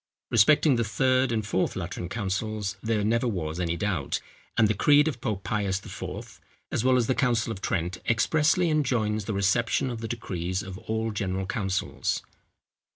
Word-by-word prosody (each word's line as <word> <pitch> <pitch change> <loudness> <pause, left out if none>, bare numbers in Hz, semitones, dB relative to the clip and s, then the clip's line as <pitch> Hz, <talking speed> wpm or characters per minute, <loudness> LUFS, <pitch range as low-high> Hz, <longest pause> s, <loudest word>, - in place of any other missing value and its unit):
Respecting 130 +5 +5
the 115 - +2
third 130 +3 +2
and 110 -2 -1
fourth 95 - 0
Lateran 90 -1 -4
councils 105 0 -2
there 110 -2 0
never 115 +3 +1
was 85 -6 -3
any 85 -1 -1
doubt; 95 -7 -1 0.4
and 110 - +5
the 105 - +2
creed 145 +8 +5
of 140 -6 -3
Pope 105 -5 -2
Pius 100 0 -1
IV., - - -7 0.3
as - - 0
well 130 0 +4
as 120 - +2
the 130 - +2
council 120 -5 +1
of 100 -3 -6
Trent, 90 -1 -1
expressly 155 +8 +3
enjoins 115 -8 +1
the 110 - -2
reception 115 +6 +1
of 115 -2 -5
the 115 - -3
decrees 95 -5 -3
of 95 -1 -8
all 110 0 -2
general 95 -2 -2
councils. 95 -1 -2
110 Hz, 170 wpm, -27 LUFS, 95-120 Hz, 0.4 s, Respecting